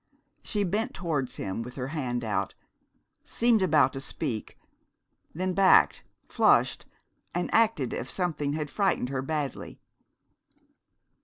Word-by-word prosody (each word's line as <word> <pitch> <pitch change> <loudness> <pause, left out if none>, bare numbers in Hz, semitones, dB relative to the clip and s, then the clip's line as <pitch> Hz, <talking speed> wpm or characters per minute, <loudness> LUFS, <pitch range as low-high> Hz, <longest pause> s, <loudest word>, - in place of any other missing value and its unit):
She 210 -3 -1
bent 215 +7 -1
towards 155 -7 -2
him 95 +3 -4
with 125 +2 -8
her 130 -1 -4
hand 125 -6 -2
out, 105 -3 -2 0.7
seemed 235 -2 +2
about 155 -7 +4
to 135 - -5
speak, 130 -6 -4 0.8
then 185 +2 -1
backed, 195 0 +5 0.2
flushed, - - +3 0.5
and 175 - -2
acted 220 - +2
as 125 - -4
if - - -13
something 155 -6 -1
had 150 -2 -3
frightened 195 -11 +1
her 135 -1 -2
badly. 145 -1 -4
150 Hz, 130 wpm, -28 LUFS, 130-185 Hz, 0.8 s, backed